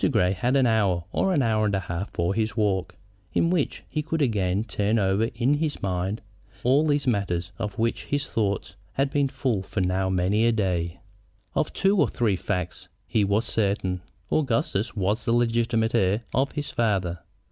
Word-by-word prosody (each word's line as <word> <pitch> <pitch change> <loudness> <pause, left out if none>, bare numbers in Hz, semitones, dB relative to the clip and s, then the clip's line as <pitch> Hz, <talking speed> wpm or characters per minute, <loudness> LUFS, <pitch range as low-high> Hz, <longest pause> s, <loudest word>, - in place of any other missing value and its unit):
Grey 90 0 +3
had 120 +8 0
an 135 -2 +4
hour 100 -7 +2
or 190 - +1
an 150 -7 +2
hour 110 -2 +2
and 105 -1 +1
a 95 - 0
half 85 +2 -4
for 85 +3 -1
his 110 +2 -1
walk, 100 -4 0 0.4
in 170 - +3
which 170 -6 -1
he 155 - -2
could 160 +1 -2
again 105 -7 +1
turn 105 0 0
over 100 +1 +2
in 125 +4 +2
his 150 0 -1
mind 95 +3 -2 0.4
all 140 +5 +4
these 145 -1 +1
matters 95 -7 0
of 105 -3 -4
which 115 +1 -1
his 145 -1 -1
thoughts 100 -5 -2 0.2
had 135 0 0
been 145 -1 +2
full 125 -6 -1
for 95 +2 -4
now 95 +1 +1
many 95 +4 +2
a - - +4
day. 90 -6 -1 0.5
Of - - 0
two 195 +1 +2
or - - +4
three 110 -5 +1
facts 90 -1 -3 0.2
he 110 - +1
was 100 +3 +1
certain. 100 -4 0 0.3
Augustus 115 -6 0
was 105 +2 0
the 115 - +1
legitimate 115 -1 +1
heir 105 0 +2
of 135 +2 +1
his 145 -1 -2
father. 95 -7 0
110 Hz, 185 wpm, -25 LUFS, 95-120 Hz, 0.5 s, an